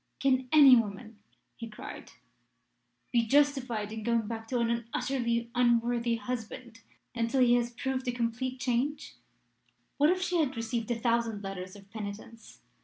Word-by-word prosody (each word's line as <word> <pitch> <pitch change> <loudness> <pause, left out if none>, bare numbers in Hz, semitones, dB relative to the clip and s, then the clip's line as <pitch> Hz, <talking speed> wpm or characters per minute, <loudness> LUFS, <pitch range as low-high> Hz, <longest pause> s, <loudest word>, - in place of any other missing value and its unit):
'Can 260 -2 +2
any 285 -4 +9
woman,' 215 -1 -2 0.4
he 230 -1 -8
cried, 215 - -9 1.0
'be 235 -2 +3
justified 255 -6 +1
in 220 0 -5
going 230 0 0
back 225 0 -6
to 250 - -1
an 235 -1 -1
utterly 235 -2 -1
unworthy 240 -1 +2
husband 235 -1 -6 0.3
until 230 +2 0
he 240 -1 +5
has 240 -1 +2
proved 260 +2 -3
a - - +2
complete 245 +2 -3
change? 265 +4 -2 0.8
What 295 +2 +4
if 370 +1 +2
she 360 -2 0
had 285 -4 0
received 230 0 -3
a 240 - 0
thousand 230 -3 0
letters 185 -1 -6
of 195 -1 -14
penitence? 220 +2 -9
235 Hz, 150 wpm, -29 LUFS, 230-255 Hz, 1.0 s, any